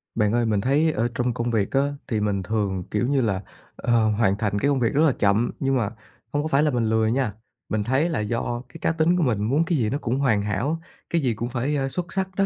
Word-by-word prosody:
Bạn 105 -1 +2
ơi, 120 0 +2
mình 105 -3 +1
thấy 145 +7 +2
ở 115 -4 0
trong 120 0 0
công 120 +1 -2
việc 105 -4 0
á 135 - +3 0.3
thì 110 -5 0
mình 100 -2 0
thường, 100 -2 -1
kiểu 105 +3 0
như 140 -1 +2
là, 100 -4 0 0.3
ờ, 115 -2 +2
hoàn 105 -2 +2
thành 105 -1 -1
cái 140 - +2
công 140 -2 +2
việc 115 -3 +1
rất 145 - +3
là 150 - +5
chậm, 105 +4 +2
nhưng 135 0 +1
mà 110 -5 0 0.4
hông 145 0 +1
có - - -1
phải 145 -1 +3
là 150 - +2
mình 120 -3 0
lười 110 0 +2
nha, 125 -4 0 0.4
mình 110 -1 0
thấy 130 +9 +1
là 160 - -1
do 115 +2 -2
cái - - -11
cá - - +2
tính 165 +2 +2
của 175 - +2
mình 110 -7 +1
muốn 140 +9 +2
cái 170 -2 +1
gì 110 -5 +1
nó 140 - -1
cũng 125 -1 -2
hoàn 115 -7 +2
hảo, 120 +11 -1 0.3
cái 170 - +1
gì 125 -4 +1
cũng 120 +2 -4
phải, 130 +4 -1
ơ, 135 -1 0
xuất 175 +5 -4
sắc 190 -1 0
đó 195 - +2
120 Hz, 275 wpm, -24 LUFS, 105-140 Hz, 0.4 s, là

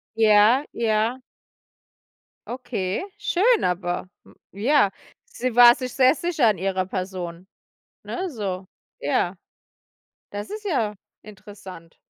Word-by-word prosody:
Ja, 220 +4 +5
ja. 225 +2 0 1.3
Okay, 215 -7 -3 0.2
schön, 415 +4 +2
aber, 180 0 -2
hm, - - -20 0.2
ja, 205 0 +2 0.3
sie 250 -1 -4
war 240 0 +9
sich 255 -2 -6
sehr 260 -1 +5
sicher 320 -6 +1
an 210 -3 +2
ihrer 190 0 -1
Person, 185 -2 -5 0.6
ne, 370 +1 -4
so. 195 - -4 0.3
Ja, 175 +6 0 1.0
das 205 +1 -6
ist 425 0 -7
ja 230 - 0 0.3
interessant. 195 -5 -12
215 Hz, 110 wpm, -23 LUFS, 190-255 Hz, 1.3 s, war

